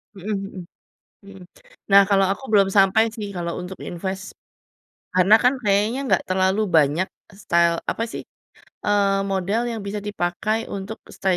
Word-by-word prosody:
Mhm 205 +3 -4
mhm, 195 -2 -5 0.6
mhm. 195 -1 -13 0.5
Nah, 200 0 +9
kalau 195 -1 +4
aku 235 - -5
belum 200 -2 +5
sampai 195 +3 +5
sih 210 -2 -5
kalau 170 -1 -3
untuk 180 +1 -8
invest. 190 +2 -5 0.8
Karena 185 +3 +5
kan 250 +2 +4
kayaknya 210 +5 +1
gak - - +3
terlalu 190 +2 +1 0.2
banyak 155 +5 +3 0.4
style 170 0 +3
apa 225 - -3
sih, - - -5 0.6
eee, 200 -1 +2
model 195 +4 0
yang 225 -2 -4
bisa 210 +1 -4
dipakai 205 +2 -2 0.2
untuk 195 +3 -7 0.2
stay 190 -2 +1
195 Hz, 150 wpm, -22 LUFS, 185-210 Hz, 0.8 s, Nah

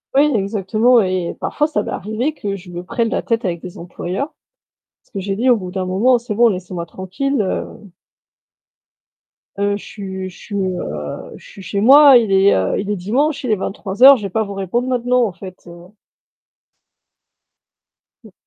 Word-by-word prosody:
Oui, 290 +2 +4
exactement 215 +4 +2
et 185 -3 -2
parfois 300 - -1
ça 310 - -1
m'est - - -6
arrivé 220 - -3
que 200 -7 -4
je 185 -2 -12
me 175 0 -7
prenne 230 +5 -1
la - - -2
tête 230 -1 -1
avec 170 -2 -2
des 180 -2 -9
employeurs 180 - -5 0.7
parce - - -35
que 195 - -3
j'ai 195 +1 -3
dit: 245 +5 0
«Au 245 - +5
bout 185 -4 -6
d'un 185 0 -3
moment, 225 +8 +3
c'est 235 -2 -5
bon, 235 +3 +5
laissez-moi 180 -3 -4
tranquille, 195 +11 -3
heu 190 - -1 1.9
heu, 200 0 0
je - - -12
suis 190 -2 -7
je 180 - -16
suis, 205 - -9
heu, 125 - -4
je - - -15
suis 195 - -12
chez 190 +2 -3
moi, 275 +3 +8
il 225 -4 0
est, 195 +1 +4
heu, 95 0 0
il 200 - -4
est 210 - 0
dimanche, 270 - -1
il 250 - -1
est - - +4
23:00, 210 +7 +4
je 215 - -9
vais 200 - -3
pas 220 +4 0
vous 200 -1 -7
répondre 195 +6 -2
maintenant, 250 -1 +1
en 210 - -3
fait, 185 0 -10
heu.» 175 +1 -13 2.3
Mmh. 220 - -16
200 Hz, 190 wpm, -18 LUFS, 185-240 Hz, 2.3 s, moi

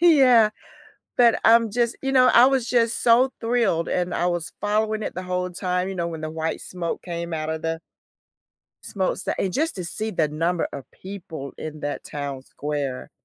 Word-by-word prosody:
Yeah. 260 -10 +6 0.7
but 235 -2 +5
I'm 230 -1 +6
just, 235 +1 0
you 270 - 0
know, 255 -1 +6
I 240 +2 +8
was 265 -3 +1
just 235 -2 +2
so 245 +3 +5
thrilled 230 -8 +1
and 180 0 -1
I 175 - +1
was 175 -2 -2
following 215 +1 0
it - - -4
the 185 - -4
whole 180 0 -2
time, 180 +1 -1
you 195 - -4
know, 170 -2 -2
when 160 -2 -6
the 155 - -3
white 160 0 -3
smoke 175 -2 -4
came 170 -1 -5
out 155 -1 -2
of 160 0 -4
the 165 0 -2 1.0
smo 190 -2 -1
that - - -1
and 190 -2 0
just 315 +3 0
to 180 - -4
see 215 +5 -3
the 160 -5 +1
number 165 +3 -1
of 140 -2 -8
people 175 -8 -8
in 155 -1 -6
that 145 - -4
town 140 -2 -5
square. 140 -2 -4
180 Hz, 195 wpm, -24 LUFS, 160-230 Hz, 1.0 s, I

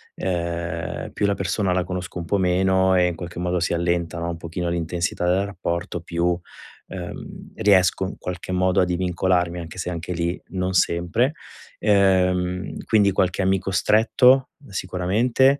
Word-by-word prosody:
Uhm, 85 -2 -3
più - - 0
la 100 - +1
persona 95 +1 -1
la 90 0 +1
conosco 90 -1 -5
un 85 - -5
po' 100 +4 +1
meno 95 0 +3
e 90 -1 +4
in 85 - -2
qualche 85 0 -7
modo 90 0 0
si 85 - 0
allenta, 85 0 -1
no, 85 0 -2
un 85 - -4
pochino 85 +1 -4
l'intensità 85 +1 -2
del 95 +3 +2
rapporto, 85 -3 -3
più, 85 +1 -2 0.6
uhm, - - -8
riesco 95 -3 +3
in 95 - -6
qualche 90 0 -6
modo 95 +1 +2
a - - +3
divincolarmi, 90 0 0
anche 80 +1 -8
se, 90 - -3
anche 85 0 -5
lì, 85 +1 -2
non 95 0 -2
sempre, 90 - +2 0.5
ehm, 95 -2 +2
quindi 105 -3 +4
qualche 95 0 +1
amico 95 0 +1
stretto, 125 +7 +4
uhm, 140 - -17
sicuramente, 105 +9 +2
90 Hz, 160 wpm, -23 LUFS, 85-95 Hz, 0.6 s, e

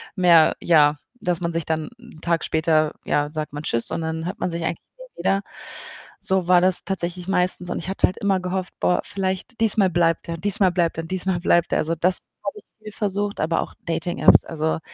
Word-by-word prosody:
mehr 170 -4 +5
ja, 150 -3 +4 0.2
dass 175 -1 -1
man 170 0 -2
sich 165 -2 -2
dann 160 -1 -2
'n 235 -9 -15
Tag 170 -1 0
später, 155 -1 +1
ja, 145 0 0
sagt 155 -1 -5
man: 145 +1 -6
„Tschüss“ 115 -5 +2
und - - -2
dann 160 0 -3
hört 185 +6 -5
man 180 - -2
sich 170 0 -4
eigentlich 165 - -2 0.2
nie - - -15
wieder. 195 0 +1 0.8
So 190 -2 +1
war 180 -1 +5
das 185 0 +3
tatsächlich 180 -2 -3
meistens 180 -1 +1
und - - -2
ich 170 - -6
hatte 195 - +2
halt 185 - -6
immer 195 -2 +1
gehofft: 185 0 -4
„Boah, 180 - +2
vielleicht 190 +5 -4
diesmal 210 -3 +3
bleibt 165 -1 +1
er, 170 0 -4
diesmal 195 +1 +1
bleibt 170 -2 0
er, 165 - -3
diesmal 185 +1 -1
bleibt 170 -1 +2
er!“ - - +3
Also 165 +2 -1
das 180 +3 +3 0.2
habe - - -4
ich - - -22 0.2
viel 215 - -8
versucht, 205 -1 -2
aber 160 +2 0
auch - - -7
Dating-Apps. 165 +1 +3
Also, 160 -1 -2
175 Hz, 215 wpm, -22 LUFS, 165-190 Hz, 0.8 s, mehr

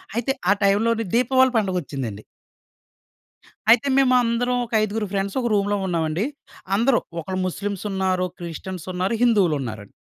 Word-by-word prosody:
అయితే 240 +3 0 0.2
ఆ - - +7
టైమ్‌లోనే 225 +3 +2
దీపావళి 260 +2 +4
పండుగొచ్చిందండి. 140 - -3 1.5
అయితే 245 +4 +5
మేమందరం 250 -2 +3
ఒక 230 - -14
ఐదుగురు 215 0 -2
ఫ్రెండ్స్ 195 +4 -1
ఒక 240 - 0
రూమ్‌లో 205 0 +1
ఉన్నామండి. 165 +2 -1 0.5
అందరూ 240 +3 +3 0.2
ఒకళ్ళు 185 +3 -3
ముస్లిమ్స్ 200 +2 -4
ఉన్నారు, 190 -1 0
క్రిస్టియన్స్ 175 +1 -7
ఉన్నారు, 185 +5 -1
హిందువులున్నారండి. 145 - +1
200 Hz, 120 wpm, -23 LUFS, 180-230 Hz, 1.5 s, ఆ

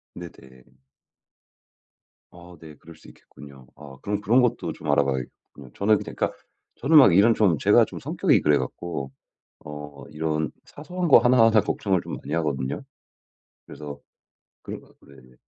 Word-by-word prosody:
네네. 65 -7 -14 1.6
아 90 0 -15
네. 80 -2 -12
그럴 80 +1 -16
수 - - -19
있겠군요. 70 -3 -16
아 70 -3 -13
그럼 105 0 -3
그런 115 +6 +3
것도 110 -9 -1
좀 75 - -6
알아봐야겠군요. 70 -3 -3
저는 105 +1 +2
그니까 - - -4 0.4
저는 155 +5 +2
막 100 -11 +7
이런 110 +5 +5
좀 90 -9 +2
제가 - - +4
좀 - - -10
성격이 - - +1
그래 75 -1 +2
갖고 70 +1 -6 0.5
어 75 -1 -10
이런 80 -1 -2
사소한 175 +3 -5
거 135 - +8
하나하나 115 -2 +4
걱정을 95 -3 -1
좀 - - -7
많이 70 - -9
하거든요. 70 -5 -2 0.8
그래서 70 -1 -10 0.6
그런 - - -7
것 - - -21
같고 - - -25
네네. 65 -2 -19
80 Hz, 300 characters per minute, -24 LUFS, 70-105 Hz, 1.6 s, 거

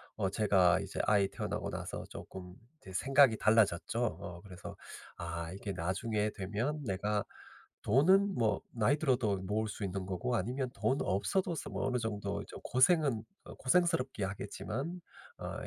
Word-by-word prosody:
어 100 -3 0
제가 95 -4 +4
이제 - - -5
아이 100 -1 +4
태어나고 - - -3
나서 - - -5
쪼끔 90 -1 -9 0.3
이제 95 - -11
생각이 135 +2 +5
달라졌죠. 110 +1 +3
어 90 -6 -5
그래서 90 -2 -9 0.4
'아 85 -1 -4
이게 100 +2 -5
나중에 105 +5 -1
되면 110 +10 -2
내가 105 -1 0 0.6
돈은 190 - +4
뭐 115 -7 +1
나이 120 +5 +3
들어도 125 -9 +1
모을 105 +3 -1
수 105 0 -5
있는 95 -1 -3
거고 120 +6 -1
아니면 125 +5 -1
돈 135 - +1
없어도 170 - 0
서 155 - -5
뭐 - - -2
어느 125 -1 +1
정도 110 -3 -3
좀 - - -9
고생은 130 -3 +3 0.2
어 - - -10
고생스럽기야 130 - +1
하겠지만 135 - -5 0.3
어 - - -5
110 Hz, 315 characters per minute, -33 LUFS, 95-130 Hz, 0.6 s, 생각이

